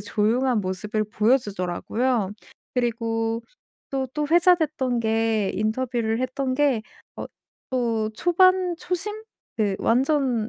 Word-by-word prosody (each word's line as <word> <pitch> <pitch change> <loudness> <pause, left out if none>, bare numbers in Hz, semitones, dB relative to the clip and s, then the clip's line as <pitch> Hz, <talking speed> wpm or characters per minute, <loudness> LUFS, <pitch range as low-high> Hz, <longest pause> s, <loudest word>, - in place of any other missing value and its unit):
조용한 220 +4 +1
모습을 205 +3 -2
보여주더라고요. 210 0 0 0.4
그리고 230 -1 -1 0.5
또 265 -1 -1
또 300 -1 -1
회자됐던 315 -8 +3
게 225 -2 +1
인터뷰를 225 +1 -1
했던 255 0 -1
게 270 -6 +2 0.3
어 - - -5 0.4
또 230 -4 0
초반 360 - +3
초심? 415 +6 -3 0.3
그 205 -3 0
완전 255 -2 +1
240 Hz, 225 characters per minute, -24 LUFS, 220-275 Hz, 0.5 s, 회자됐던